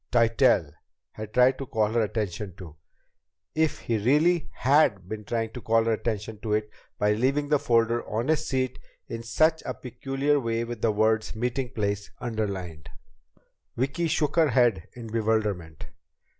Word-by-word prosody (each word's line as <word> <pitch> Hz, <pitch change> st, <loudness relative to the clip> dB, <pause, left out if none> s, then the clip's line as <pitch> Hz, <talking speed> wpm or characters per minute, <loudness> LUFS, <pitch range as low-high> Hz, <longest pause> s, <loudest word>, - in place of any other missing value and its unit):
Tytell 115 Hz, -, +3 dB, 0.4 s
had 110 Hz, -1 st, -8 dB
tried 125 Hz, +3 st, +4 dB
to 135 Hz, -, -5 dB
call 110 Hz, -2 st, +1 dB
her 115 Hz, 0 st, +2 dB
attention 105 Hz, -3 st, -3 dB
to! 85 Hz, -5 st, -11 dB, 0.8 s
If 160 Hz, -1 st, 0 dB
he 115 Hz, -2 st, -1 dB
really 150 Hz, +9 st, +2 dB
had 130 Hz, -, +2 dB
been 105 Hz, +1 st, -6 dB
trying 115 Hz, 0 st, -2 dB
to 125 Hz, -, -8 dB
call 115 Hz, +1 st, +3 dB
her 115 Hz, 0 st, +1 dB
attention 110 Hz, -1 st, -3 dB
to 105 Hz, -1 st, -2 dB
it 105 Hz, 0 st, -1 dB, 0.3 s
by 105 Hz, 0 st, +2 dB
leaving 135 Hz, +6 st, 0 dB
the 150 Hz, -1 st, +3 dB
folder 115 Hz, -1 st, +2 dB
on 115 Hz, +6 st, -2 dB
his 155 Hz, 0 st, +1 dB
seat 130 Hz, -1 st, -1 dB, 0.3 s
in 115 Hz, -, -5 dB
such 155 Hz, +7 st, +2 dB
a -, -, -4 dB
peculiar 135 Hz, +4 st, -1 dB
way 115 Hz, -2 st, -1 dB
with 115 Hz, -1 st, -6 dB
the 115 Hz, -, +3 dB
words 110 Hz, +1 st, +1 dB
"meeting 125 Hz, +3 st, -2 dB
place" 100 Hz, -2 st, -2 dB
underlined! 100 Hz, -10 st, -4 dB, 0.9 s
Vicki 140 Hz, +7 st, 0 dB
shook 150 Hz, -1 st, 0 dB
her 160 Hz, -3 st, +5 dB
head 120 Hz, -8 st, +2 dB
in 120 Hz, -1 st, -9 dB
bewilderment. 105 Hz, -7 st, -1 dB
115 Hz, 160 wpm, -26 LUFS, 105-130 Hz, 0.9 s, her